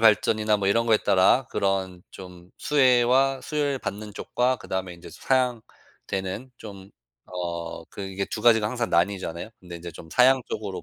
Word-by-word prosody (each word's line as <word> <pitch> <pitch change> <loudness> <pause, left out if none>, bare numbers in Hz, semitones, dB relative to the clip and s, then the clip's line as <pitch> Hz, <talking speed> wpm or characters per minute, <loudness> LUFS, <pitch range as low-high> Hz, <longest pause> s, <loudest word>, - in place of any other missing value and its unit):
발전이나 110 0 +3
뭐 100 - -2
이런 115 +3 +2
거에 110 -2 +5
따라 95 +7 +3
그런 95 -2 -1
좀 90 -1 -12
수혜와 130 -1 +3
수혜를 145 -3 -1
받는 105 +1 -6
쪽과 125 +1 0
그다음에 95 -4 -5
인제 85 - -13
사양되는 120 -3 -3
좀 100 -2 -11 0.3
어 85 -2 -5
그 - - -10
이게 95 0 -3
2 - - -6
가지가 110 -3 +5
항상 120 +1 -2
나뉘잖아요. 85 +1 -1
근데 90 -1 -9
이제 85 +1 -8
좀 80 - -12
사양 130 +3 +4
쪽으로 105 -3 -5
105 Hz, 325 characters per minute, -25 LUFS, 95-125 Hz, 0.3 s, 거에